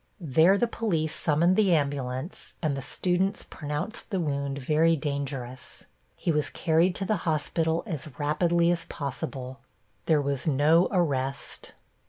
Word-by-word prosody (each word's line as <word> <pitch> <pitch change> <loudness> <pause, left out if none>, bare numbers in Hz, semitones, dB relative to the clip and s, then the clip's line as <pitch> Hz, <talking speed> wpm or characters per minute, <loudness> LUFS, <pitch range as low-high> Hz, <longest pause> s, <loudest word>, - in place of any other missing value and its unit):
There 165 +4 +4
the 240 - +2
police 175 -10 -1
summoned 170 +4 +2
the 195 -5 +4
ambulance 140 +1 -3
and 155 -4 0
the 135 - -4
students 185 +8 0
pronounced 150 +10 -5
the 195 -4 -1
wound 140 -3 -2
very 155 +4 +3
dangerous. 135 -4 -5 0.3
He 170 - -1
was 150 -1 0
carried 170 +2 +2
to 195 - -2
the 215 +2 +1
hospital 160 +1 0
as 155 -7 -5
rapidly 170 +3 +2
as 170 -1 -2
possible. 135 -3 -5 0.5
There 155 -2 +4
was 140 0 -2
no 155 +4 +4
arrest. 140 -7 -2
155 Hz, 140 wpm, -27 LUFS, 140-175 Hz, 0.5 s, There